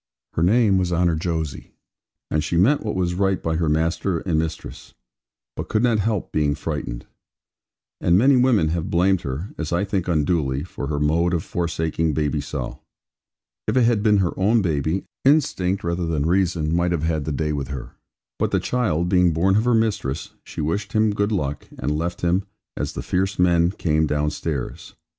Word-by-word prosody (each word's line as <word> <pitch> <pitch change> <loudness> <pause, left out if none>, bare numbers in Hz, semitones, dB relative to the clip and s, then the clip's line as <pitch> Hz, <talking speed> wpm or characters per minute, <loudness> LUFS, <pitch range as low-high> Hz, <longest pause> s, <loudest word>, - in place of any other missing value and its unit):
Her - - -1
name 100 +1 +4
was 90 -1 -1
Honour 85 -1 +2
Jose, 80 -5 -3 0.6
and 75 0 +1
she 85 - -1
meant 125 - +4
what 105 - -2
was 90 -1 0
right 95 +1 +1
by 80 -1 -1
her 80 -2 +1
master 80 +4 0
and 85 -4 0
mistress; 80 0 -6 0.6
but - - -5
could 110 +1 +1
not 115 -3 +3
help 105 -2 -1
being 75 -2 +1
frightened. - - -4 0.9
And 85 +1 +3
many 135 +6 +5
women 125 -10 +3
have 85 0 -2
blamed 90 +2 +2
her, 70 +9 -4
as 80 -2 -3
I 85 +3 +1
think 95 -3 -2
unduly, 75 -4 +1
for 80 -5 -6
her 75 0 -2
mode 85 +4 +2
of 80 - -2
forsaking 80 -2 -1
baby 75 -1 0
so. 70 -3 -5 0.9
If - - +1
it 125 - +5
had 115 -3 +3
been 105 -1 +4
her 95 -3 +1
own 105 +3 +3
baby, 80 +2 0 0.2
instinct 130 -10 +2
rather 85 0 -1
than 75 -3 0
reason 85 -3 +1
might 85 0 +1
have 80 -3 -1
had 80 -3 0
the 75 - -2
day 75 +2 -1
with 70 -2 -3
her; 65 -4 -6 0.5
but - - +1
the - - +1
child 90 -10 0
being 90 -2 +3
born 95 +5 +2
of 110 +3 +2
her 125 -1 +3
mistress, 95 -10 -1
she - - -6
wished 85 +7 -2
him 110 -1 +3
good 100 +1 0
luck, 75 -8 -2
and 75 +4 -1
left 85 +3 -3
him, 90 +3 +1 0.3
as - - -3
the - - -5
fierce 95 +2 -1
men 85 -1 +4
came 80 -4 0
downstairs. 75 -2 -3
85 Hz, 190 wpm, -22 LUFS, 80-95 Hz, 0.9 s, many